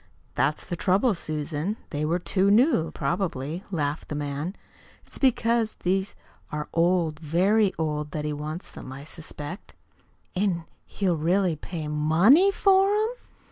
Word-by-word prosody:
"That's 150 +2 0
the 175 - -3
trouble, 200 +7 +2
Susan 155 +3 -3
they 150 0 -1
were 165 +3 +1
too 190 +2 +1
new, 210 - +4
probably," 160 +1 -2
laughed 150 -5 -2
the 150 - -3
man. 145 +5 -3 0.5
"It's - - -10
because 235 -4 +2
these 190 +2 -1 0.4
are 150 -1 -3
old, 165 -2 +2
very 190 +6 +3
old, 150 -2 -2
that 150 0 -4
he 150 - -1
wants 155 +3 -6
them, 130 - -9
I 135 +1 -8
suspect. 155 +3 -8 0.6
"An' 180 -3 0 0.2
he'll 185 -4 0
really 175 +2 +2
pay 155 0 -6
MONEY 165 - +5
for 390 0 +4
'em?" 425 +2 +2
170 Hz, 140 wpm, -26 LUFS, 150-200 Hz, 0.6 s, MONEY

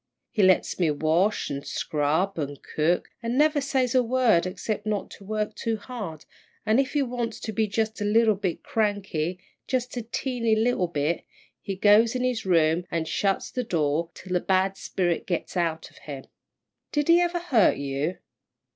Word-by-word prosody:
He 215 - +1
lets 185 -1 +3
me 170 -3 +3
wash, 160 +8 +1
an' 140 0 -4
scrub, 155 +8 -1
an' 145 -1 -3 0.2
cook, 165 +3 +1
an' 235 +2 -2
never 300 0 +4
says 265 -3 0
a 255 - +5
word 235 -8 +3
excep' 195 +3 -3
not 210 -2 -2
to - - -12
work 215 +1 -2
too 225 -1 -2
hard, 205 - -7 0.4
an' 215 +4 +3
if 275 - 0
he 290 -2 +2
wants 240 -3 -3
to 220 - -4
be 220 +1 0
jus' 220 +1 -2
a - - 0
little 220 +1 +4
bit 190 -4 -3
cranky, 195 -6 -1 0.3
jus' 255 -1 -1
a - - -1
teeny 230 0 -1
little 220 -4 +1
bit, 155 0 -1 0.4
he 195 - -4
goes 210 +4 +5
in 250 - 0
his 245 -5 -1
room 165 -1 +3
an' 165 -1 -1
shuts 195 +4 -1
the 250 - -2
door 165 -5 0
till 185 -1 -7
the 180 - +3
bad 190 +1 +1
spirit 175 -3 -1
gets 175 +1 -3
out 165 -2 -1
of - - -18
him." 140 -3 -8 0.7
"Did 295 -1 0
he 340 +1 +6
ever 350 0 +1
hurt 280 - +3
you?" 140 +5 -2
205 Hz, 180 wpm, -26 LUFS, 170-235 Hz, 0.7 s, he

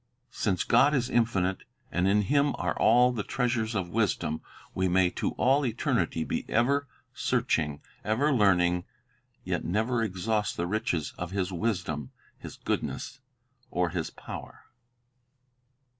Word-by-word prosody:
Since 95 -4 0
God 145 +2 +4
is 125 -3 0
infinite, 100 -6 +1 0.3
and 90 +2 +1
in 105 +1 +3
Him 140 +5 +2
are - - -1
all 125 +2 +5
the 120 -4 -2
treasures 120 -1 -1
of 90 -4 -2
wisdom, 100 -8 0 0.3
we 95 0 +1
may 90 0 +3
to - - -2
all 135 +3 +3
eternity 115 -8 0
be - - -2
ever 140 +5 +2 0.3
searching, 75 -1 0 0.2
ever 135 +8 +2
learning, 90 -6 +3 0.6
yet - - -2
never 110 +6 0
exhaust 105 +1 -1
the 85 - 0
riches 85 -5 -1
of 90 - -3
His 95 0 -2
wisdom, 85 - -2 0.3
His - - -10
goodness, 125 +3 -3 0.5
or 90 -1 0
His 85 -3 -2
power. - - -9
105 Hz, 135 wpm, -28 LUFS, 90-120 Hz, 0.6 s, all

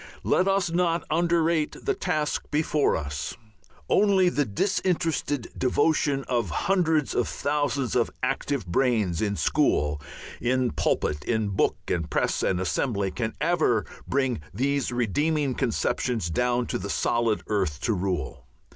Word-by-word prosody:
Let 185 - +2
us 195 -3 +1
not 170 -1 +1
underrate 165 -1 +2
the 410 - +2
task 155 - -2
before 150 -1 +1
us. 70 -3 -4 0.5
Only 195 -3 +4
the 145 -4 0
disinterested 160 - -1
devotion 140 +1 +1
of 120 -3 -1
hundreds 160 -6 +1
of 120 - +1
thousands 145 -3 -1
of 120 -2 +2
active 135 -2 -1
brains 100 -2 +1
in 105 -2 0
school, 75 - +1 0.4
in 125 0 +1
pulpit, 75 0 0
in 110 -3 0
book 95 - +1
and 85 -2 -1
press - - 0
and 90 - +1
assembly 100 +1 -1
can 110 +1 -3
ever 125 - +2 0.2
bring 130 - 0
these 135 +5 0
redeeming 135 - 0
conceptions 120 - -1
down 125 +5 +1
to - - -3
the 100 +2 -5
solid 115 +1 +1
earth 95 -9 -1
to 115 - +1
rule. 90 -9 -3
125 Hz, 135 wpm, -26 LUFS, 105-155 Hz, 0.5 s, Only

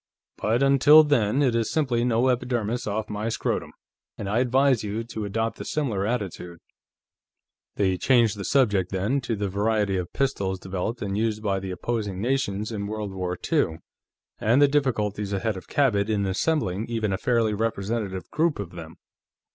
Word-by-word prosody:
But 115 +5 +1
until 140 +3 +7
then, 135 -2 +2
it 130 -4 +2
is 115 -1 0
simply 130 -7 +1
no 125 +1 +2
epidermis 120 -2 -1
off 105 +1 -2
my 105 +2 -3
scrotum. - - -2 0.5
And 100 - -5
I 105 +4 +1
advise 130 -1 +3
you 105 +2 -3
to 110 -2 -5
adopt 115 +2 -2
a - - -3
similar 110 -10 -1
attitude." 95 -7 -4 1.2
They 95 -2 +1
changed 120 -5 +3
the 100 - -6
subject, 100 -8 +2
then, 100 +9 0
to 115 -2 -2
the 100 -1 -2
variety 100 0 0
of 90 -1 -4
pistols 100 -9 -1
developed 95 +5 -4
and 100 -1 -2
used 110 0 -1
by 100 -2 0
the 95 0 -6
opposing 100 +1 -3
nations 110 -3 -1
in 100 -2 -4
World 105 -2 -4
War 90 -1 -3 0.2
II, 80 - +2 0.6
and 120 +5 +3
the 145 - +7
difficulties 105 -8 0
ahead 110 +2 -1
of 95 - -9
Cabot 110 -7 +1
in 105 -2 +1
assembling 105 - 0
even 110 -4 -1
a - - 0
fairly 115 -3 +1
representative 105 -2 -2
group 160 0 +1
of 100 -4 -6
them. 80 -2 -9
110 Hz, 170 wpm, -25 LUFS, 100-125 Hz, 1.2 s, until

